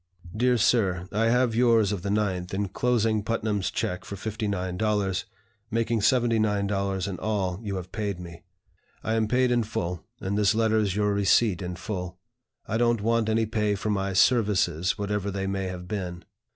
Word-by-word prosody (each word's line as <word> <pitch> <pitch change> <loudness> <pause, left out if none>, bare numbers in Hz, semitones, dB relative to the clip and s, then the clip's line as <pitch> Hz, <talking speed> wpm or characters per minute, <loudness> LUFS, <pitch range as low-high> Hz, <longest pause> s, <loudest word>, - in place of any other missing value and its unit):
"DEAR 125 +2 +3
SIR, 95 -6 +2
I 110 +2 +1
have 120 0 +3
yours 115 -3 +4
of 100 -4 -2
the 100 - -3
9th, 95 -3 -1
inclosing 110 +2 +1
Putnam's 105 -3 -1
check 90 - -3
for 100 - -7
$59, 100 -1 -1 0.4
making 115 0 0
$79 105 -5 +1
in 95 -3 -5
all 100 -4 -1
you 100 -3 -4
have 90 -1 -6
paid 100 -4 -3
me. 85 -1 -9 0.6
I 110 - -1
am 110 -1 +1
paid 125 +2 +2
in 120 -1 +3
full, 90 -6 -3 0.2
and 100 +2 -2
this 105 0 +3
letter 110 -1 +2
is 100 -3 0
your 105 0 +1
receipt 100 -1 +3
in 90 -1 -4
full. 90 -1 -5 0.5
I 110 - -1
don't 120 -2 +2
want 115 0 +1
any 110 +1 +2
pay 105 -1 0
for 105 +2 -2
my 100 -1 -1
'services,' 95 -4 +2
whatever 100 -1 -2
they 95 0 -3
may 95 0 -2
have 90 -1 -6
been. 90 -4 -5
105 Hz, 170 wpm, -26 LUFS, 95-110 Hz, 0.6 s, yours